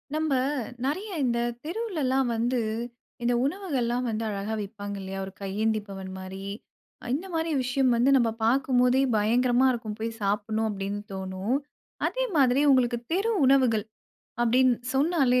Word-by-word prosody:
நம்ப 310 -2 0 0.5
நிறைய 370 +10 -2 0.2
இந்த 235 -2 +1 0.3
தெருவுலலா 330 - -1 0.2
வந்து, 240 +2 +1 0.6
இந்த 245 - +2
உணவுகள்லாம் 265 -8 -1
வந்து 220 0 -2
அழகா 205 +1 -3
விப்பாங்க 205 0 -6
இல்லையா? 195 0 -5
ஒரு 190 - -10
கையேந்தி 215 +3 0
பவன் 195 -1 -7
மாரி. 190 +1 -7 0.6
அ - - -10
இந்த 350 +7 -5
மாதிரி 325 0 0
விஷயம் 255 +1 +2
வந்து 240 +3 +3
நம்ப 235 -3 +3 0.2
பார்க்கும் 255 +1 +2
போதே 250 +1 +4 0.2
பயங்கரமா 245 +4 +3
இருக்கும். 225 -4 -4
போயி 225 +1 -3
சாப்பிடனு 210 +2 0
அப்டீனு 200 0 -3
தோனும். 190 +5 -2 0.5
அதே - - -1
மாதிரி 265 -1 +4
உங்களுக்கு 245 -2 +3 0.2
தெரு 400 +6 +1
உணவுகள் 255 -5 +4 0.6
அப்படின், 250 +2 +4 0.2
சொன்னாலே 270 -3 +3
240 Hz, 140 wpm, -27 LUFS, 210-270 Hz, 0.6 s, போதே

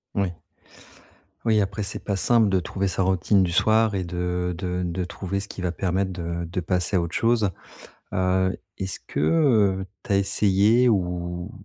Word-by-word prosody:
Ouais. 95 -4 -1 1.1
Oui, 110 -2 +4
après 100 +1 -2
c'est 100 - -4
pas 100 -2 -1
simple 115 0 +3
de 95 -1 +2
trouver 95 +2 -2
sa 95 - -1
routine 95 +1 +3
du 85 -2 -1
soir 110 +2 +3
et 95 - -1
de 90 0 -2
de 90 +1 -2
de 90 +1 -2
trouver 95 +2 -4
ce 100 - -6
qui 95 - -8
va 90 -1 -1
permettre 95 +1 -1
de 85 -1 -4
de 90 +3 -4
passer 90 +2 0
à - - +2
autre 85 0 -4
chose. 115 -3 +2 0.6
Heu, 95 0 +1 0.2
est-ce 95 -1 -3
que, - - -4
heu, 100 - +3 0.2
tu 110 - -1
as - - +4
essayé 105 +4 +3
ou 90 -2 -1
95 Hz, 180 wpm, -24 LUFS, 90-100 Hz, 1.1 s, Oui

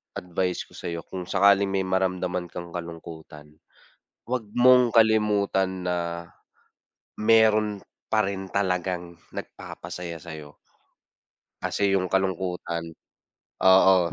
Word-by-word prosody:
advice 90 0 -2
ko - - -22
sayo 85 -1 -5
kung 90 -2 -6
sakaling 100 +1 +4
may 95 -1 0
maramdaman 90 -1 -1
kang 85 -1 -7
kalungkutan, 80 -3 -9 0.7
wag 125 -3 -1
mong 125 -1 +6
kalimutan 105 -4 +2
na 90 - +1 1.2
mayro'n 110 -2 +4 0.3
pa 110 -2 +3
rin 95 -1 -4
talagang 90 -3 -1 0.2
nagpapasaya 85 -2 -7
sayo. 75 -3 -10 1.1
Kasi 100 -1 0
yung 90 - -1
kalungkutan. 90 -3 -2 0.7
Oo, 95 -2 +6
95 Hz, 100 wpm, -25 LUFS, 85-100 Hz, 1.2 s, mong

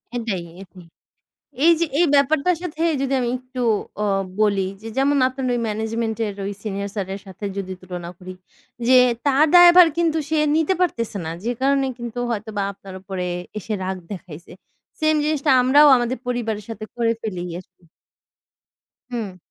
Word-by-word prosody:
এটাই, 225 -7 -2 0.2
এটাই। 180 -3 -16 0.8
এই 335 - +7
যে 335 - +2
এই 350 - +5
ব্যাপারটার 310 +5 +2
সাথে 325 -2 -5 0.2
যদি 275 0 -1
আমি 245 -1 -1
একটু 255 0 -7 0.4
অ - - +1 0.4
বলি 200 -3 +2
যে, 225 - -8
যেমন 280 +1 +3
আপনার 260 0 -5
ওই 240 - -1
ম্যানেজমেন্ট 220 +1 -2
এর 205 - -5
ওই 200 - -3
সিনিয়র 200 -1 -3
স্যার 195 -3 -2
এর 195 - -10
সাথে 190 +2 -8
যদি 190 -1 -4
তুলনা 180 -2 -7
করি। 185 0 -9 0.5
যে 255 0 +7 0.3
তার 285 +2 +4
দায়ভার 350 0 +9
কিন্তু 330 -2 +1
সে 315 - +1 0.2
নিতে 320 +4 +2
পারতেছে 230 - -1
না। 160 - -3
যে 235 - -1
কারণে 275 0 +2
কিন্তু 240 0 -6
হয়তোবা 215 -2 -3
আপনার 195 0 -12
উপরে 190 -2 -4 0.3
এসে 215 +1 -4
রাগ 190 0 -3
দেখাইছে। 175 -4 -9 0.5
সেম 310 0 +3
জিনিসটা 300 -1 +1
আমরাও 285 +4 +6
আমাদের 240 +2 -1
পরিবারের 225 -4 -2
সাথে 215 -1 -6
করে 230 -1 +1
ফেলি 185 -5 -4 0.2
আরকি। 180 -1 -19 1.3
হুম। 210 -6 -5
230 Hz, 165 wpm, -22 LUFS, 195-280 Hz, 1.3 s, দায়ভার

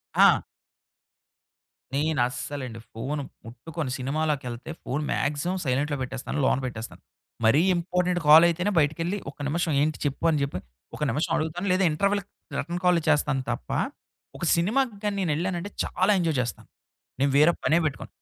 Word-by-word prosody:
ఆ! - - +6 1.5
నేను 150 0 0
అస్సలండి 125 -1 -6
ఫోన్ 135 +6 -3 0.2
ముట్టుకొను. 135 +5 -5
సినిమాలకెళ్తే 135 -1 -2
ఫోన్ 140 +4 -2
మాక్సిమమ్ 150 +6 -1
సైలెంట్‌లో 140 +3 0
పెట్టేస్తాను. 130 +3 -4
లోన - - +3
పెట్టేస్తాను. 115 -2 -7 0.4
మరీ 135 +8 +5
ఇంపార్టెంట్ 180 +1 0
కాల్ 155 +3 +9
అయితేనే 180 +4 0
బయటికెళ్ళి 165 +6 0
ఒక - - -31
నిమిషం 160 +1 0
ఏంటి 155 +1 +1
చెప్పు 140 +3 -2
అని 155 -2 +2
జెప్పి, 140 -9 -2 0.4
ఒక - - -11
నిమిషం 150 +7 -1
అడుగుతాను. 160 +5 -2
లేదా 185 - +2
ఇంటర్వెల్‌కి 200 +5 0 0.3
రిటర్న్ 175 +1 -3
కాల్ 180 -1 +5
చేస్తాను 145 -3 +2
తప్ప 90 - -5 0.7
ఒక - - -8
సినిమాకి 220 +7 +1
గాని 205 -1 0
నేను 175 -4 0
వెళ్ళానంటే 175 +3 -2
చాలా 185 +4 +1
ఎంజాయ్ 165 -5 0
చేస్తా. 125 - -4 0.6
నేను 140 +1 +2
వేరే 150 +3 +6
పనే 160 - +4
పెట్టుకోను. 145 - -3
155 Hz, 145 wpm, -26 LUFS, 140-175 Hz, 1.5 s, కాల్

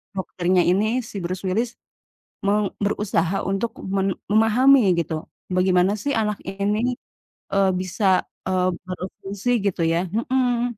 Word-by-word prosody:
dokternya 185 -1 +1
ini, 195 +4 +3 0.2
si - - -13
Bruce 185 +2 -4
Willis, 225 +6 0 0.8
meng 205 0 +1
berusaha 195 -3 0
untuk 195 +4 -1 0.3
men 195 -1 0 0.2
memahami 240 +6 +5 0.2
gitu 165 -1 -1 0.4
bagaimana 185 +1 +3
sih 285 - 0
anak 210 -1 -1
ini, 210 +5 0 0.6
eee, 195 -1 +4
bisa, 185 +3 -3 0.4
eee, 185 -1 +1 0.2
berfungsi 190 +4 -5 0.2
gitu 190 -3 -1
ya, 165 - +2 0.3
mhm. 250 -2 +2
195 Hz, 125 wpm, -23 LUFS, 185-220 Hz, 0.8 s, memahami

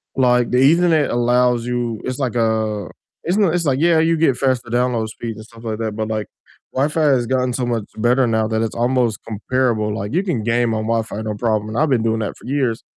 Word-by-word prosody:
like, 125 -2 +3
the 125 - +2
ethernet 160 +2 +4
allows 120 0 +2
you 120 -3 -2
It's 130 0 -3
like 130 -4 -2
a 110 -4 0 0.3
it's 180 +5 0
n 210 - +4
it's 175 -2 0
like, 135 -1 +1
yeah, 170 0 +4
you 165 +1 +2
get 155 -5 +3
faster 130 -3 0
download 120 -2 0
speeds 115 -1 -6
and 110 - -10
stuff 115 0 -16
like 110 -2 -3
that, 110 -2 -3
but, 110 0 -2
like, 110 -1 -2 0.5
Wi-Fi 150 +4 0
has 130 -5 +3
gotten 130 -1 0
so 125 0 -1
much 120 -3 -1
better 125 +3 +3
now 110 -1 +1
that 110 0 -1
it's 110 - -3
almost 120 -2 +1
comparable 110 -1 -1
like, 105 0 -5
you 180 - +1
can 170 - -1
game 115 0 +1
on 110 0 -2
Wi-Fi, 115 -2 -2
no 110 -1 -3
problem, 110 -1 -1
and 110 - -5
I've 155 0 +2
been 125 -4 +2
doing 115 0 0
that 105 - -3
for - - -16
years. 130 -4 -1
120 Hz, 230 wpm, -19 LUFS, 110-130 Hz, 0.5 s, ethernet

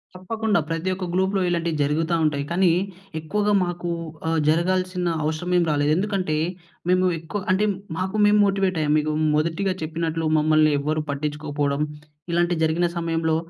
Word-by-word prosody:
తప్పకుండా. 215 +2 0
ప్రతి 165 +3 -2
ఒక్క 185 0 -4
గ్లూప్‍లో 190 +1 +1
ఇలాంటివి 170 -2 -1
జరుగుతా 160 +4 +1
ఉంటాయి. 145 -2 +1
కానీ 180 0 +3 0.5
ఎక్కువగా 205 +6 0
మాకు 175 0 -4 0.4
ఆహ్, 165 0 +1
జరగాల్సిన 185 +2 +1 0.2
అవషరం 160 +4 -2
ఏం 175 - +4
రాలేదు. 145 0 +2
ఎందుకంటే 190 -5 -1 0.5
మేము 185 0 +3
ఎక్కువ 165 +6 -5
అంటే, 195 +3 +2 0.3
మాకు 190 +3 -2
మేము 210 0 +5
మోటివేట్ 195 -2 +1
అయ్యాం. 150 -1 +1
మీకు 155 +1 -1 0.2
మొదటిగా 170 +5 0
చెప్పినట్లు 165 0 -2
మమ్మల్ని 155 0 +4
ఎవ్వరూ 155 +2 -1
పట్టించుకోకపోవడం 145 0 -2 0.5
ఇలాంటివి 175 -1 +1
జరిగిన 160 +2 +2
సమయంలో 165 -1 0
170 Hz, 140 wpm, -23 LUFS, 155-185 Hz, 0.5 s, మేము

